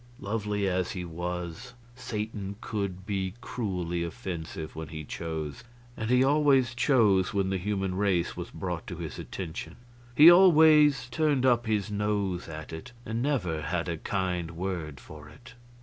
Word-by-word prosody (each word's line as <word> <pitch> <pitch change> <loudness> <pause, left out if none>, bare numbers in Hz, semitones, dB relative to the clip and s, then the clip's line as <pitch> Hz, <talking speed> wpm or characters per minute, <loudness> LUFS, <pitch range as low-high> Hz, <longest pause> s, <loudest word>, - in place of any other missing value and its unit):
Lovely 105 -1 -1
as 90 -1 0
he 90 -2 -4
was, 90 +7 -5 0.2
Satan 105 -5 -5
could 100 -5 -4
be 95 -1 -2
cruelly 90 -8 -3
offensive 85 -5 -6
when 80 0 -6
he 80 +1 -7
chose; 80 -2 -5 0.3
and 110 0 -4
he 125 +1 +5
always 135 -4 +4
chose 110 -7 +3
when 95 -1 +1
the 95 - 0
human 95 0 -1
race 95 -3 0
was - - -6
brought 90 -3 -5
to 90 - -5
his 80 -4 -6
attention. 80 -2 -6 0.4
He 155 +5 +10
always 155 -5 +6
turned 150 -5 +2
up 120 -2 +3
his 105 -2 0
nose 100 -3 -1
at 80 0 -8
it, 125 +11 -8
and 115 +2 -2
never 95 - 0
had 85 +3 -2
a 85 -1 -2
kind 90 -4 -2
word 85 -7 -4
for 75 +4 -12
it. 120 +12 -15
95 Hz, 155 wpm, -28 LUFS, 85-120 Hz, 0.4 s, He